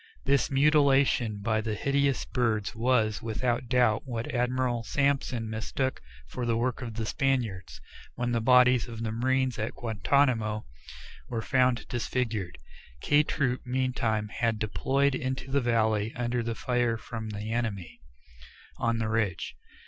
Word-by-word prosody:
This 140 -1 +2
mutilation 135 -6 +3
by 110 0 +1
these 110 -1 -3
hideous 140 -1 +1
birds 115 -3 0
was, 115 -2 +1
without 115 +2 -1
doubt, 120 -4 +3
what 115 -2 -4
Admiral 125 -1 0
Sampson 135 -3 0
mistook 110 +4 -2 0.2
for 125 - -6
the 115 -1 +1
work 125 +3 -1
of 115 -3 -6
the 115 0 -2
Spaniards, 110 - -1 0.4
when 120 0 -1
the 115 -1 +1
bodies 125 0 +5
of 115 -1 -6
the 110 - -2
marines 130 +1 0
at 110 - -3
Guantanamo 115 -1 +1 0.6
were 115 -2 -3
found 125 -2 +2
disfigured. 115 -6 -2 0.4
K 145 - +4
Troop 130 -4 -1
meantime 125 -4 -1
had 115 0 0
deployed 135 +6 +1
into 130 +1 -3
the 140 0 +2
valley 110 -3 +1
under 120 0 -1
the 115 0 -3
fire 120 -2 0
from 110 -1 -6
the 105 +1 -5
enemy 110 -7 -3 0.8
on 115 0 0
the 115 -1 -1
ridge. 110 -5 -1
120 Hz, 140 wpm, -28 LUFS, 110-130 Hz, 0.8 s, bodies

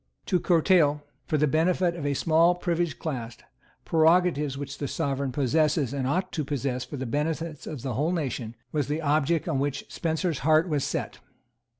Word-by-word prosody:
To 180 - +1
curtail, 160 -4 +3 0.2
for 155 - +1
the 150 - +3
benefit 170 +4 +2
of 150 -4 -3
a 140 - 0
small 165 +4 +4
privileged 170 -4 -1
class, 120 -7 -5 0.5
prerogatives 160 -3 +3
which 140 0 -6
the 145 - -2
Sovereign 140 -2 -2
possesses 145 +1 +1
and 135 -2 -1
ought 185 +6 -1
to 155 - -2
possess 135 -3 -2
for 130 +3 -7
the 130 - -4
benefit 155 +4 -3
of 140 -6 -6
the 130 -3 -2
whole 150 +8 0
nation, 130 -9 -3 0.2
was 145 -4 -1
the 150 +3 -2
object 155 +3 +1
on 150 -5 0
which 140 0 -2
Spencer's 160 -1 -1
heart 155 +3 +3
was 150 -5 0
set. - - -3
150 Hz, 180 wpm, -26 LUFS, 140-165 Hz, 0.5 s, small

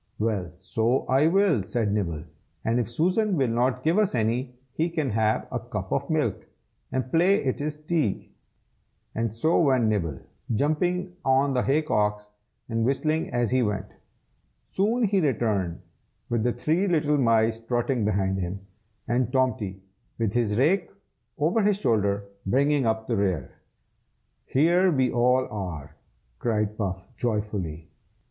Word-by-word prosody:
"Well, 105 -5 -1
so 110 +7 0
I 135 +4 +3
will!" 185 - +3
said 105 +2 -1
Nibble. 85 -7 -2 0.4
"And 115 +2 +2
if 120 - -2
Susan 185 - +1
will 135 -4 +2
not 125 +2 0
give 165 +6 +3
us 205 -10 +1
any, 125 +3 -1 0.2
he 165 +2 0
can 155 -6 -1
have 110 0 +1
a - - -1
cup - - -6
of - - -1
milk, - - -1 0.4
and 130 0 -2
play 180 +5 +3
it 130 +1 -1
is 150 +1 -2
tea." 150 - -2 1.0
So 115 +10 0
away 165 - +4
went 115 -3 +2
Nibble, 85 -10 -1 0.4
jumping 175 - 0
on 135 +1 +3
the 125 - +2
hay 145 +5 +2
cocks, 105 -6 0 0.4
and 115 -1 -1
whistling 155 +5 0
as 120 -2 0
he 130 0 +3
went. 105 -4 -1 0.8
Soon 225 +5 0
he 200 -3 +2
returned, 110 - 0 0.5
with 120 -2 0
the 120 +2 +1
three 160 +10 0
little 150 -4 +2
mice 115 -2 +3
trotting 120 +1 -1
behind 95 -2 0
him, 90 +2 -3 0.5
and 120 0 0
Tomty, 115 -8 0 0.3
with 110 -3 -1
his 115 -4 +1
rake 170 +7 +2 0.5
over 165 +9 +2
his 205 -1 +2
shoulder, 100 - +1 0.2
bringing 140 +3 +2
up 110 0 0
the 115 -2 -1
rear. 95 -5 -1 1.0
"Here 175 +6 +3
we 130 -5 +2
all 125 +2 +3
are!" 80 -8 -6 0.4
cried 105 -3 0
Puff, 95 -3 -4
joyfully. 105 -9 -3
120 Hz, 150 wpm, -26 LUFS, 105-150 Hz, 1.0 s, away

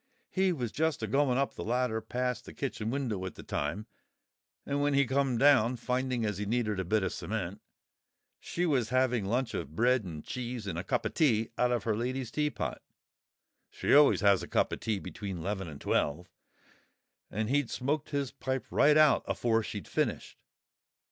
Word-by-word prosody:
He 190 0 +2
was 125 -9 -3
just 160 -1 0
a - - +2
going 135 -2 +2
up 140 0 0
the - - -6
ladder 120 -1 0
past 125 +2 -2
the - - -11
kitchen 115 -5 -3
window 120 -7 -2
at 95 - -5
the - - -10
time; 80 +9 -3 0.8
and 140 0 -1
when 145 -1 +2
he 140 0 +4
come 130 -1 +1
down, 130 -2 +5
finding 125 0 -1
as 105 -3 -2
he 105 - -3
needed 110 -3 0
a - - 0
bit 105 +3 +1
of 95 - -1
cement, 100 -3 -4 0.8
she 175 - -2
was 130 -9 +1
having 125 -4 +2
lunch 120 +5 0
of 75 +3 -5
bread 125 +2 +3
and 80 -5 -7
cheese 120 -3 -5
and 85 -4 -3
a - - -4
cup 100 - -1
o' - - +1
tea 115 -3 +2
out 125 0 +2
of 120 -4 0
her 110 -2 0
lady's 125 +1 -3
teapot—she 150 -1 -5
always 145 +1 +6
has 100 -3 +5
a 85 - -6
cup - - +1
of - - -4
tea 110 -2 -1
between 95 -3 -6
'leven 95 -1 -3
and 75 -3 -9
twelve—and 90 +6 -5
he'd 145 -3 +2
smoked 140 +4 -2
his 140 -3 -2
pipe 130 -1 -3
right 150 +1 +5
out 155 -2 +5
afore 115 -1 +1
she'd 105 -2 -6
finished. - - -2
120 Hz, 185 wpm, -30 LUFS, 105-135 Hz, 0.8 s, always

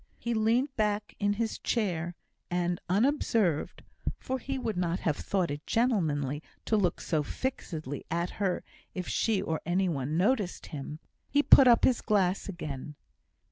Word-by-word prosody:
He 235 - -2
leant 235 +5 +2
back 210 -1 0
in 205 0 +2
his 225 +1 -2
chair, 175 -7 -1 0.3
and, 175 0 0
unobserved 210 - +1 0.3
(for 260 0 -3
he 270 +2 -3
would 225 -5 -2
not 175 0 -1
have 155 -4 +1
thought 185 -2 -1
it 145 +1 -6
gentlemanly 155 - +1 0.2
to 220 - +2
look 185 -5 +1
so 155 -2 0
fixedly 155 - -4
at 170 +1 -1
her 190 -3 0 0.3
if 180 -2 -3
she 220 -4 +1
or 160 -1 -2
any 185 +3 +1
one 145 0 -1
noticed 205 0 +1
him), 150 +1 -5 0.3
he 290 0 +3
put 270 - +8
up 235 -2 +6
his 250 - +4
glass 195 -3 +1
again. 150 -5 -6
185 Hz, 155 wpm, -29 LUFS, 165-225 Hz, 0.3 s, put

